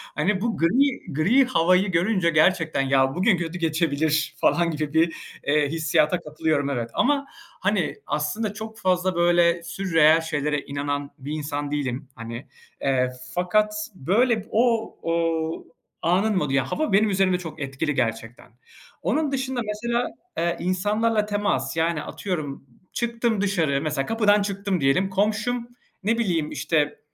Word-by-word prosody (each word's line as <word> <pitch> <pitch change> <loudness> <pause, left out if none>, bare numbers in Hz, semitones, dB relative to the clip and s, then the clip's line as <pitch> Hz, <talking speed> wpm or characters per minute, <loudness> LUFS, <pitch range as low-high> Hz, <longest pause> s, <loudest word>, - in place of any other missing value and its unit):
Hani, 185 +7 0
bu 230 0 -1
gri 235 - +1
gri 210 - +4
havayı 185 -5 +3
görünce 180 +1 +2
gerçekten, 160 -1 +2
"Ya, 135 0 +2
bugün 190 +1 +3
kötü 170 +1 -4
geçebilir." 155 -2 +1
falan 170 -1 +3
gibi, 155 +2 +1 0.4
eee, 145 -1 +2
hissiyata 155 +1 +1
katılıyorum 155 -2 -1
evet, 120 -4 -2
ama, 280 +1 +2 0.3
hani, 195 -4 0
aslında 175 +9 -1
çok 220 +1 -8
fazla, 185 -2 +1
böyle, 170 0 +3
sürreal 165 -3 +3
şeylere 150 -2 -1
inanan 145 0 -3
bir 140 +2 -7
insan 145 -1 -3
değilim 140 -2 -3
hani. 115 +2 -8 0.3
Eee, 130 -2 +1 0.3
fakat, 210 +4 +2 0.2
böyle, 215 - +1
o 230 -1 +1
o 165 -1 -1 0.4
anın 190 +6 +2
modu, 150 -6 0
yani, 135 -1 +1
hava 310 -9 -1
benim 210 +2 +4
üzerimde 190 -2 +2
çok 170 -3 -8
etkili 140 +2 -2
gerçekten. 115 -1 -3 0.5
Onun 280 - 0
dışında 265 -2 -2
mesela, 235 +3 -1 0.3
eee, 170 0 0
insanlarla 210 +4 +1
temas, 205 -11 -1
yani, 165 -1 +1
atıyorum 155 -9 -5 0.3
çıktım 235 -2 0
dışarı, 165 -9 +1
mesela 150 -3 -1
kapıdan 210 0 +3
çıktım 200 -3 -2
diyelim, 140 +8 +2
komşum, 215 +5 0 0.4
ne 225 +3 +1
bileyim, 170 -9 0
işte, 150 -3 0
170 Hz, 135 wpm, -24 LUFS, 150-210 Hz, 0.5 s, gri